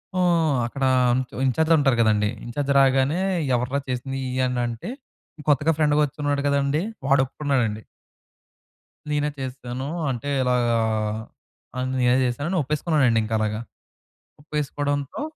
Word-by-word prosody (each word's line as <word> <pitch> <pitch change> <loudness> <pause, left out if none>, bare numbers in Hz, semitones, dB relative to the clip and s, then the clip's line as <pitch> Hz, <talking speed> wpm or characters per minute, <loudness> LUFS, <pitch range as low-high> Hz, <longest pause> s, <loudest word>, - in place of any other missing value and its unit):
హ్మ్, 170 -4 +3
అక్కడ 135 +3 -5 0.6
ఇంచార్జ్ 160 +6 +2
ఉంటారు 135 -4 +2
కదండీ. 105 -2 +2 0.2
ఇంచార్జ్ 140 +4 -2
రాగానే 135 +4 +3 0.4
"ఎవర్రా 125 +3 -1
చేసింది 130 +2 -3
ఇయన్నీ?" 125 -1 0
అనంటే 120 - -4 0.6
కొత్తగా 145 +3 +3
ఫ్రెండ్‌గా 150 -1 +3
వచ్చి 145 +1 -10
ఉన్నాడు 145 -1 +1
కదండీ. 140 +2 +1 0.3
వాడు 135 -1 +5
ఒప్పుకున్నాడండి. 125 -6 -1 1.3
నేనే 150 0 0
చేసేసాను. 130 0 -5 0.2
అంటే 125 +3 -4
ఇలాగా 125 -2 +2 1.0
ఆహ్, 130 0 -1
నేనే 125 0 +4
చేశాను 140 +6 -2
అని 190 - +1
ఒప్పేసుకున్నానండి 145 -5 +2
ఇంక 110 - -6
అలాగా. 110 0 -1 0.8
ఒప్పేసుకోవడంతో 145 - -3
135 Hz, 115 wpm, -24 LUFS, 125-145 Hz, 1.3 s, వాడు